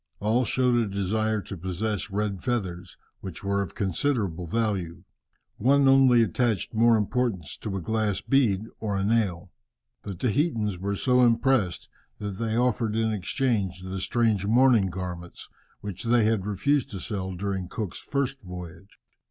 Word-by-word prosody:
All 115 +5 +2
showed 125 +2 +2
a 115 -2 +1
desire 105 +2 0
to 100 - -7
possess 95 +4 -3
red 100 -1 -2
feathers, 95 -8 -3 0.2
which 95 -4 -8
were 100 0 0
of 95 - -5
considerable 100 - -1
value. 95 -4 -2 0.5
One 140 +4 +4
only 130 -3 +6
attached 115 -2 0
more 115 +1 +5
importance 105 - -1
to 100 -3 -4
a - - -4
glass 110 0 0
bead 115 -8 +2 0.2
or 105 -3 -2
a 95 - 0
nail. 100 -5 0 0.5
The 100 -2 -6
Tahitans 110 - 0
were 100 +2 -2
so 125 +4 +3
impressed 115 -5 +2 0.3
that 100 -2 -5
they 115 -1 -1
offered 120 -3 +1
in 110 -1 +1
exchange 100 -3 -1
the 95 +1 -4
strange 110 -3 +1
mourning 115 -1 +4
garments, 90 -1 -7 0.3
which 100 +1 -6
they 115 0 +4
had 110 -3 +1
refused 140 +8 +1
to 100 -6 -6
sell 95 -3 -4
during 95 0 -3
Cook's 105 -4 -5
first 135 -1 -2
voyage. 90 0 -10
105 Hz, 150 wpm, -26 LUFS, 95-120 Hz, 0.5 s, only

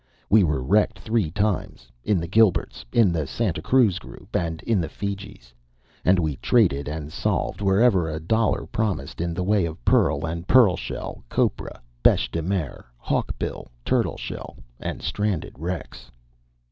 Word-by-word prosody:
We 105 -1 +7
were 75 -6 0
wrecked 105 +9 +2
three 110 -7 0
times 100 - -2
in 100 +4 +2
the 85 - -4
Gilberts, 105 0 +2
in 110 -6 +4
the 80 -4 -1
Santa 100 - -1
Cruz 115 -8 +3
group, - - -12
and 80 -2 -2
in 110 -5 +1
the 80 - -4
Fijis. 95 -11 -6 0.5
And 95 +1 +4
we 80 -5 -1
traded 80 - +2
and 75 0 -5
salved - - -1
wherever 95 -3 +3
a 80 0 -3
dollar 110 +7 +1
promised 105 -6 -2
in 85 -1 -2
the 90 - -1
way 100 0 +2
of 80 -7 -9
pearl - - +3
and 85 +2 -5
pearl 115 -9 +6
shell, 95 - -6
copra, - - -1 0.2
beche - - +3
de 80 - -2
mer, 90 -3 -3
hawkbill - - -3 0.2
turtle - - +1
shell, - - -7 0.2
and - - -5
stranded 100 -6 -2
wrecks. 80 -7 -5
90 Hz, 160 wpm, -24 LUFS, 80-105 Hz, 0.5 s, We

